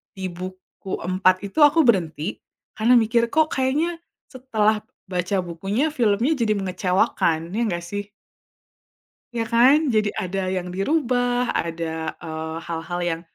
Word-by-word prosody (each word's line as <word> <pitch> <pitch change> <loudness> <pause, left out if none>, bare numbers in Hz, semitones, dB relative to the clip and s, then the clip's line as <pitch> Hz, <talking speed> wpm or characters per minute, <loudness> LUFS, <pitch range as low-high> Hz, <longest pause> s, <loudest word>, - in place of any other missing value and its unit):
di 190 -1 -4
buku 185 +1 -9 0.2
4 185 0 +3
itu 200 - -4
aku 295 +3 +1
berhenti 170 -4 +1 0.4
karena 225 +3 +3
mikir 230 +1 +2
"Kok 315 0 +3
kayaknya 265 +5 +1 0.4
setelah 225 -5 +1 0.4
baca 180 +2 0
bukunya 195 - -1
filmnya 235 -1 +2
jadi 220 -2 +2
mengecewakan." 180 -3 0
Iya 230 - 0 0.2
gak - - -11
sih? 205 0 -5 1.2
Ya 230 -1 -2
kan? 265 +6 +5
Jadi 215 -3 +1
ada 190 +1 -2
yang 185 -1 -2
dirubah 245 - 0
ada, 160 -1 -3
eee, 160 -1 -5
hal-hal 170 +2 -3
yang, 165 -1 -1
195 Hz, 130 wpm, -23 LUFS, 175-240 Hz, 1.2 s, kan